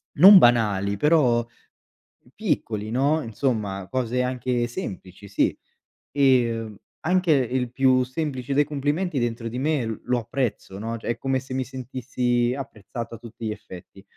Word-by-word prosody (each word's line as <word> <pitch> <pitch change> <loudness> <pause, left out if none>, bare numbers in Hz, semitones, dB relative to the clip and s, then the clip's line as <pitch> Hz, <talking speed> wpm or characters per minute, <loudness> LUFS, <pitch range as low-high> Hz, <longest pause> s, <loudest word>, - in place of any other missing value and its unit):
non 195 +6 +10
banali 105 - +3
però 125 -3 +3 0.9
piccoli, 110 -1 -2
no, 140 +6 +2
insomma 105 -6 -2
cose 125 -1 -1
anche 125 -1 -1
semplici, 95 -4 -7
sì. 100 - +1 0.6
Ehm, 120 -6 +2 0.3
anche 180 0 +2
il 125 -2 0
più 130 0 +3
semplice 130 -1 -3
dei 145 - +5
complimenti 145 +3 -1
dentro 115 -1 -2
di 120 +2 -4
me 130 -6 -1
lo 125 0 +1
apprezzo, 115 -4 -3
no, 115 +2 -4
è 115 +1 -3
come 135 +1 -1
se 130 0 -9
mi 130 0 -1
sentissi 125 -1 -1
apprezzato 115 -3 -7
a - - -9
tutti 115 -1 -9
gli - - -2
effetti, 90 -4 -11
125 Hz, 140 wpm, -24 LUFS, 115-135 Hz, 0.9 s, non